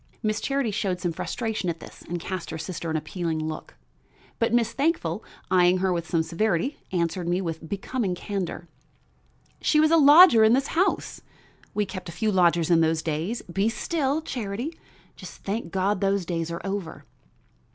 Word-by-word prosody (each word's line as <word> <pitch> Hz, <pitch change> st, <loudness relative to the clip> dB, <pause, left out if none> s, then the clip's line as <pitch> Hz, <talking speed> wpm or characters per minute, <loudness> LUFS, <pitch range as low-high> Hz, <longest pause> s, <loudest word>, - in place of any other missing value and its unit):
Miss 215 Hz, 0 st, 0 dB
Charity 275 Hz, -5 st, 0 dB
showed 195 Hz, -3 st, -1 dB
some 175 Hz, -2 st, -1 dB
flustration 220 Hz, +1 st, -3 dB
at 165 Hz, -1 st, -3 dB
this -, -, -12 dB
and 175 Hz, +1 st, -5 dB
cast 185 Hz, 0 st, -5 dB
her 160 Hz, -, -4 dB
sister 170 Hz, 0 st, -5 dB
an 160 Hz, -, 0 dB
appealing 160 Hz, +1 st, -3 dB
look; 155 Hz, -, -5 dB, 0.6 s
but 230 Hz, 0 st, +2 dB
Miss 235 Hz, -1 st, +2 dB
Thankful, 265 Hz, -, 0 dB, 0.3 s
eying 180 Hz, 0 st, +5 dB
her 185 Hz, 0 st, +1 dB
with 170 Hz, -1 st, -3 dB
some 165 Hz, -2 st, +2 dB
severity, 175 Hz, -, -1 dB
answered 170 Hz, 0 st, -1 dB
me 175 Hz, +1 st, +1 dB
with 165 Hz, -3 st, -5 dB
becoming 200 Hz, -1 st, -2 dB
candor: 180 Hz, -3 st, -4 dB, 0.9 s
"She 305 Hz, -, +3 dB
was 310 Hz, +1 st, +4 dB
a 330 Hz, -, +6 dB
lodger 295 Hz, -5 st, +8 dB
in 220 Hz, +1 st, +6 dB
this 270 Hz, +2 st, +1 dB
house. 370 Hz, +4 st, 0 dB, 0.5 s
We 210 Hz, -, +1 dB
kept 185 Hz, -2 st, -7 dB
a -, -, -7 dB
few 215 Hz, +4 st, 0 dB
lodgers 175 Hz, -3 st, +3 dB
in 165 Hz, -1 st, +5 dB
those 160 Hz, 0 st, +1 dB
days 165 Hz, +9 st, -2 dB
be 195 Hz, +5 st, 0 dB
still, 295 Hz, +4 st, -1 dB
Charity! 240 Hz, +3 st, -4 dB, 0.4 s
Just -, -, -11 dB
thank 200 Hz, -3 st, -3 dB
God 195 Hz, +1 st, 0 dB
those 195 Hz, -2 st, +1 dB
days 165 Hz, -1 st, -2 dB
are 170 Hz, 0 st, -5 dB
over." 195 Hz, -4 st, -4 dB
190 Hz, 175 wpm, -25 LUFS, 170-225 Hz, 0.9 s, lodger